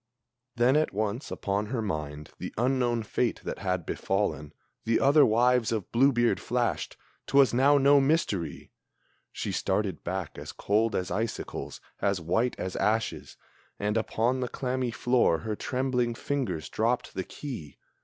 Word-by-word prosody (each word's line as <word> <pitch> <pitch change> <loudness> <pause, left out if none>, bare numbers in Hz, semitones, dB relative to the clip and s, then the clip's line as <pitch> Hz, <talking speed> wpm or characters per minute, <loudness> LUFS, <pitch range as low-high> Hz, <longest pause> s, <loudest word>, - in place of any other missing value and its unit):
Then, 120 +3 +4
at 155 -7 +1
once, 110 +5 -2
upon 100 +1 -2
her 120 +2 -2
mind 75 -7 -4
the - - -5
unknown 120 -1 +1
fate 115 +2 -1
that - - -5
had 90 -3 -1
befallen 95 -7 -1 0.3
The 115 0 +2
other 145 +2 +6
wives 120 +1 +3
of 110 -5 -3
Blue 135 +4 +5
beard 120 -2 +2
flashed 120 -1 -1 0.3
'twas 140 -2 +5
now 140 +4 +5
no 140 +1 +6
mystery! 135 - -1 0.6
She - - -4
started 95 -3 -1
back 90 -3 -4
as - - -8
cold 110 +2 +1
as 90 -1 -2
icicles, 110 +5 -4 0.2
as 100 -2 +1
white 115 +9 0
as 95 - -4
ashes, 110 +1 -1 0.4
And 105 +1 -1
upon 115 +3 0
the 125 -1 -2
clammy 130 0 -2
floor 120 -7 +2
her 110 -1 -3
trembling 125 -1 -1
fingers 120 - -2
dropped 115 +3 -1
the 95 - -3
key. 90 - -8
115 Hz, 150 wpm, -28 LUFS, 100-125 Hz, 0.6 s, other